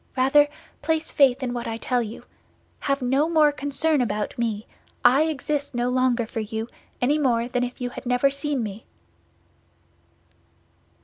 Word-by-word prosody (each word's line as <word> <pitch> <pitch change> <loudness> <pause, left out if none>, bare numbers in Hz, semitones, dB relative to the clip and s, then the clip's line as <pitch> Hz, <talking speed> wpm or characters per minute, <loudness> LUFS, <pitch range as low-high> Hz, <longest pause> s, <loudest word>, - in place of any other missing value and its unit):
Rather, 275 +3 +5 0.3
place 320 +1 -1
faith 270 -2 +4
in 245 -1 -2
what 240 -1 -4
I 225 0 -3
tell 245 +1 0
you. 225 0 -7 0.6
Have 275 -1 -1
no 270 +6 +2
more 310 -3 +5
concern 290 +1 0
about 210 -3 -2
me; 225 -2 -2 0.4
I 275 +5 +6
exist 290 -2 -2
no 240 +1 0
longer 250 -2 +2
for 225 - -5
you, 220 +1 -4 0.3
any 285 +5 +2
more 240 -4 +2
than 250 0 -1
if 245 0 -5
you 245 -1 -3
had 250 - -8
never 250 +3 +3
seen 280 -2 -2
me." 210 +1 -6
255 Hz, 160 wpm, -24 LUFS, 240-285 Hz, 0.6 s, I